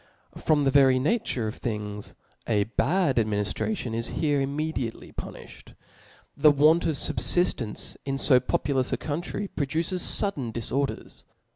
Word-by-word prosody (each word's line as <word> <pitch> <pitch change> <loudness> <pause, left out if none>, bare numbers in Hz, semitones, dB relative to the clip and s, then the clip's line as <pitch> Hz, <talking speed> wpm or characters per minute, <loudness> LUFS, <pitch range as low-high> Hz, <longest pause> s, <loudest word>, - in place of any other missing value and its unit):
From 150 -2 +1
the 135 - +2
very 135 -2 +5
nature 130 - -1
of 110 - -6
things, 105 -3 -5 0.3
a 105 -3 +2
bad 140 - 0
admini 105 -2 +1
Uration 165 - -3
is 115 +1 -1
;here 145 -3 +1
immediately 140 -4 -3
punijhed. - - -10 0.6
The 150 +2 +5
want 150 +4 +4
of 160 - 0
fubfiftence 135 -4 +1
in 135 -1 -2
fo 130 -2 +4
populous 130 +1 -1
a - - 0
country, 170 +6 -4
produces 165 +5 -2
fudden 145 - +1
diforders. 135 +4 -3
135 Hz, 135 wpm, -26 LUFS, 120-155 Hz, 0.6 s, very